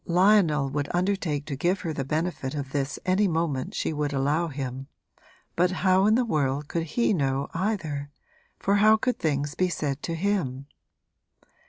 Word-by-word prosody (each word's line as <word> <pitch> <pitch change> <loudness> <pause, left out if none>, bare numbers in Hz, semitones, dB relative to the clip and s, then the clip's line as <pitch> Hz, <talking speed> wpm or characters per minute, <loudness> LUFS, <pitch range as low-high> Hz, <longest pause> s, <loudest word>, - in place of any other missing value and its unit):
Lionel 175 -5 +4
would 145 0 -2
undertake 175 -6 0
to 145 - -4
give 180 +8 0
her 160 - -3
the 140 - -2
benefit 155 -1 -2
of 140 -2 -4
this 140 0 -2
any 190 +2 +3
moment 160 -6 -1
she - - -1
would 150 -1 -2
allow 145 +5 +1
him, 135 -2 -5 0.7
but 180 +1 +3 0.2
how 190 +1 +5
in 215 - +5
the 250 +1 +2
world 145 - 0
could 165 +3 -4
he 235 -2 +3
know 140 -4 0
either, 165 -7 -2 0.5
for 200 +1 +1
how 215 +2 +6
could 250 +3 -1
things 145 -2 -1
be 185 +3 +1
said 145 -4 -2
to 165 - -3
him? 165 -8 -1
155 Hz, 170 wpm, -26 LUFS, 140-185 Hz, 0.7 s, how